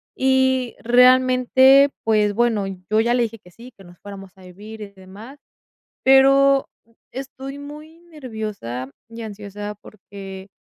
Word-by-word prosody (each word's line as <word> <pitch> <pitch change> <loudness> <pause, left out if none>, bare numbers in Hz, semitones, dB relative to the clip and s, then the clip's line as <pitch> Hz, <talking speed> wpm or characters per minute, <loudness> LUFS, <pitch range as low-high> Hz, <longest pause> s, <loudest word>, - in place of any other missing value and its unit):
Y 260 -1 +1
realmente, 255 +2 +4
pues, 210 -2 +1
bueno, 225 -2 0 0.2
yo 215 +1 +2
ya 235 +2 +1
le 245 -1 +1
dije 225 -1 -6
que 180 - -20
sí, 235 +7 -14
que 195 - -16
nos 175 -1 -17
fuéramos 195 -2 -11
a 190 - -17
vivir 210 +5 -12
y 210 - -7
demás. 200 +8 -14 0.7
Pero 275 +1 +4 0.4
estoy 270 +1 -8
muy 300 +3 -12
nerviosa 220 - -7 0.2
y 230 0 -10
ansiosa, 205 -1 -8
porque 195 -2 -12
230 Hz, 135 wpm, -20 LUFS, 205-265 Hz, 0.7 s, realmente